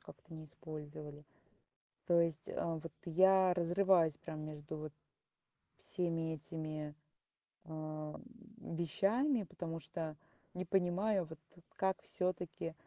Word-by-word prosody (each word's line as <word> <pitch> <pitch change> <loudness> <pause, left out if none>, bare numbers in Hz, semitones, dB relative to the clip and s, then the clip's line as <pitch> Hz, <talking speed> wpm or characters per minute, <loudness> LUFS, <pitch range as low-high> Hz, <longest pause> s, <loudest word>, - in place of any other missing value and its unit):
как-то - - -13
не 155 -1 -7
использовали. 150 -1 -8 0.8
То 170 -1 +6
есть, 165 -2 0
э, - - -5 0.3
вот 165 -1 -6
я 185 +2 +6
разрываюсь 175 -2 +4
прям 155 -1 -6
между 150 0 -6
вот 155 -1 -5 0.9
всеми 165 -3 -1
этими, 155 -1 -4 0.7
а, 155 -1 -4 0.4
вещами, 215 - +2
потому 165 -2 -5
что 160 0 -4 0.4
не 185 +1 -2
понимаю, 190 +2 +3
вот, 160 - -7 0.4
как 190 0 +1
все-таки 175 -2 -2
165 Hz, 105 wpm, -37 LUFS, 155-185 Hz, 0.9 s, То